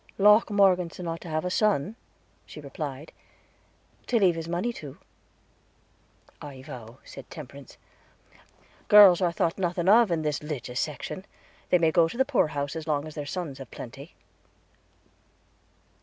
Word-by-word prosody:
"Locke 210 +3 +5
Morgeson 180 -4 +2
ought 165 0 -4
to - - -10
have 155 +2 -2
a 180 - -2
son," 205 -2 +1 0.5
she - - -11
replied, 145 0 -7 1.0
"to 245 - +2
leave 190 -5 +4
his 165 0 -6
money 180 +8 -2
to." 145 - -10 1.4
"I 135 -3 -10
vow," 120 -4 -10
answered 135 - -12
Temperance, 140 -2 -11 1.1
"girls 200 -4 +8
are 175 -2 +2
thought 170 +1 -1
nothing 175 -1 -1
of 225 +2 +6
in 165 -2 -1
this 150 -1 -1
'ligous 130 -5 -5
section; 155 +5 -4 0.5
they 180 - +5
may 165 -2 +2
go 165 0 +4
to 175 - -8
the 265 - +3
poor 270 - +2
house, 145 -1 -4
as 160 -1 -6
long 150 -1 -1
as 155 - -9
the 145 -1 -6
sons 150 -4 -5
have 135 -4 -10
plenty." 135 - -10
165 Hz, 155 wpm, -26 LUFS, 145-185 Hz, 1.4 s, girls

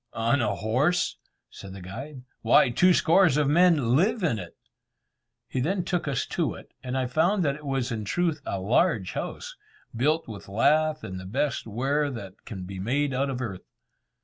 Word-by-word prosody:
"On 115 +4 +1
a 105 -3 0
horse!" 130 - 0 0.3
said 95 -1 -10
the 95 - -9
guide, 125 +9 -8 0.2
"why, 120 +2 +5
two 180 +9 +4
score 180 +2 +5
of 150 -2 +2
men 150 -6 +4
live 200 - +2
in 130 -11 +1
it." 90 -2 -10 0.9
He 130 - -3
then 180 +8 0
took 175 -4 -2
us 135 -4 -1
to - - -2
it, - - -13
and 130 0 -3
I 130 - 0
found 170 +9 +1
that 140 - +2
it 150 0 -10
was 135 -2 -1
in 110 -2 -3
truth 160 - -1
a 100 - -3
large 110 - +1
house, - - -5 0.4
built 150 +7 +1
with 105 -3 -9
lath 155 +8 +2
and 95 0 -6
the 95 - -9
best 135 +4 -1
ware 140 +7 0
that 100 -7 -9
can 95 -4 -7
be 95 +1 -7
made 135 +7 0
out 135 +2 0
of 130 -1 -3
earth. 100 -7 -6
130 Hz, 190 wpm, -26 LUFS, 110-155 Hz, 0.9 s, why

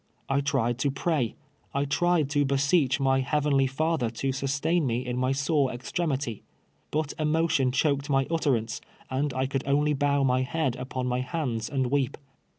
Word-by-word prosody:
I 135 +1 +1
tried 130 -4 0
to 140 - +1
pray 140 -3 -1 0.2
— - - -38
I 140 +1 +1
tried 160 +1 +2
to 145 -1 +3
beseech 140 0 +2
my 135 -1 +3
Heavenly 140 0 +2
Father 150 -2 0
to 135 +4 -2
sustain 140 +4 0
me 120 +1 -1
in 125 0 -2
my 130 +1 +1
sore 140 0 +1
extremity, 135 - -2 0.5
but 155 -1 -1
emotion 155 -4 +2
choked 140 +1 +1
my 135 -1 +3
utterance, 130 -9 0 0.3
and 140 +2 0
I 130 0 +1
could 135 0 -2
only 145 +2 +2
bow 140 0 +2
my 130 -1 +2
head 135 -1 -1
upon 130 0 -4
my 125 0 0
hands 125 -5 -2
and 130 -3 -1
weep. 140 -3 0
135 Hz, 170 wpm, -27 LUFS, 130-150 Hz, 0.5 s, to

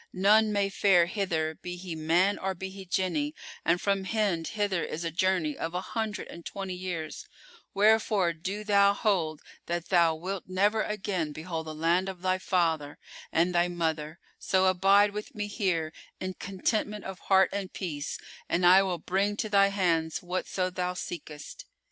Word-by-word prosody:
None 210 +3 +5
may 200 -1 +1
fare 195 -3 +4
hither 170 -5 -1
be 180 +2 -7
he 180 -1 -6
man 170 +6 +2
or 190 0 -2
be 190 +2 -6
he 190 -1 -10
Jinni, 195 - -1 0.3
and 170 +2 +2
from 195 0 0
Hind 195 -6 0
hither 205 -5 -1
is 165 - -4
a 165 - -2
journey 175 -3 +1
of 165 +2 -4
an 180 - -2
hundred 220 -3 -3
and 170 - -10
twenty 195 0 -5
years: 180 -4 -5 0.5
wherefore 210 -3 +3
do 190 +6 -5
thou 200 -1 +4
hold 170 -8 0 0.2
that 175 0 -3
thou 170 -3 +4
wilt 185 +4 -5
never 205 +4 +2
again 190 -7 -2
behold 160 +1 -5
the 155 - -6
land 170 +4 +1
of 185 -2 -9
thy 185 0 +1
father 165 -6 0 0.3
and 175 +2 +2
thy 175 0 +3
mother; 160 -2 -2 0.2
so 190 0 +2
abide 195 +2 +5
with 210 +1 -7
me 210 -1 -2
here, 180 -7 -1 0.3
in 185 0 -3
contentment 210 +3 -2
of 190 -1 -6
heart 190 -1 +4
and 200 -2 -3
peace, 155 -6 -4 0.3
and 175 +1 +2
I 185 +2 +8
will 185 -2 -1
bring 195 +5 0
to 220 - -2
thy 200 -1 +5
hands 170 -5 0
whatso 185 +1 -2
thou 180 0 -2
seekest. 155 -4 -7
185 Hz, 175 wpm, -28 LUFS, 170-200 Hz, 0.5 s, I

